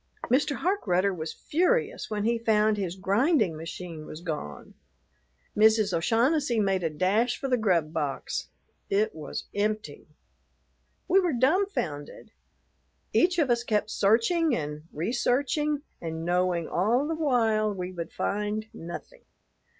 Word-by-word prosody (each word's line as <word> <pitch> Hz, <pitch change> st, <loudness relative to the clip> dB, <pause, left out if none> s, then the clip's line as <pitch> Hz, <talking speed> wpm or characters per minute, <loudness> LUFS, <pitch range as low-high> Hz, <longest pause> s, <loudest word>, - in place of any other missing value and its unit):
Mr. 280 Hz, +2 st, +2 dB
Harkrudder 200 Hz, -, +1 dB
was 155 Hz, -2 st, -4 dB
furious 445 Hz, +8 st, 0 dB
when 210 Hz, -1 st, -2 dB
he 230 Hz, +1 st, +1 dB
found 215 Hz, -1 st, +3 dB
his 190 Hz, -4 st, -3 dB
grinding 205 Hz, -, +2 dB
machine 165 Hz, 0 st, -7 dB
was 155 Hz, -, -8 dB
gone. 150 Hz, -, -6 dB, 0.8 s
Mrs. 215 Hz, -2 st, +4 dB
O'Shaughnessy 240 Hz, -, +2 dB
made 195 Hz, -2 st, +1 dB
a 165 Hz, -, 0 dB
dash 205 Hz, +10 st, +1 dB
for 275 Hz, -, -3 dB
the 255 Hz, -, +3 dB
grub 175 Hz, -9 st, +1 dB
box. 140 Hz, -4 st, -3 dB, 0.4 s
It 205 Hz, +2 st, +1 dB
was 155 Hz, -3 st, -6 dB
empty. 210 Hz, -7 st, -2 dB, 1.0 s
We 375 Hz, +2 st, +5 dB
were 355 Hz, -5 st, +1 dB
dumbfounded. 260 Hz, -, -1 dB, 0.8 s
Each 355 Hz, 0 st, +3 dB
of 295 Hz, -7 st, +2 dB
us 235 Hz, 0 st, +1 dB
kept 215 Hz, -2 st, 0 dB
searching 245 Hz, -, +3 dB
and 150 Hz, 0 st, -5 dB
researching 275 Hz, -, 0 dB, 0.2 s
and 160 Hz, 0 st, -4 dB
knowing 175 Hz, -1 st, +1 dB
all 235 Hz, +10 st, +1 dB
the 325 Hz, -, -1 dB
while 230 Hz, -9 st, +2 dB
we 185 Hz, -2 st, -5 dB
would 170 Hz, -2 st, -6 dB
find 210 Hz, +1 st, -2 dB
nothing. 225 Hz, -, -9 dB
215 Hz, 130 wpm, -27 LUFS, 175-260 Hz, 1.0 s, We